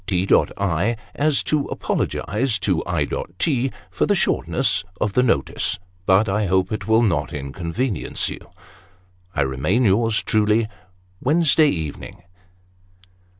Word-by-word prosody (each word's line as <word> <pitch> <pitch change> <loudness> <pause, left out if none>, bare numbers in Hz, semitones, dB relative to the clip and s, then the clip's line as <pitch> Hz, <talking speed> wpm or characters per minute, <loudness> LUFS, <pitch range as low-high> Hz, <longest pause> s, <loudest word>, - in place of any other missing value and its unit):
" - - -33
T. 95 -1 0 0.3
I. 100 +4 0 0.2
as 150 -1 +1
To 150 -2 0
apologise 115 +4 -1
to 95 -5 0
I. 85 -5 0 0.3
T. 135 - +1 0.2
for - - 0
the - - +3
shortness - - +1 0.2
Of 105 -2 -1
the 125 - +4
notice 90 - 0 0.3
But 95 +3 +4
i 105 +1 0
hope 95 +1 +1
it 105 -2 -4
will 110 +1 +4
not 80 - 0
unconvenience 85 - -2
you. - - -5 0.5
" 90 0 -34
I - - +1
remain 70 - 0
yours 110 +2 +3
Truly 110 +1 +2 0.3
" 90 0 -36
Wednesday 155 +1 +4
evening." 80 - -5
100 Hz, 140 wpm, -21 LUFS, 90-115 Hz, 0.5 s, the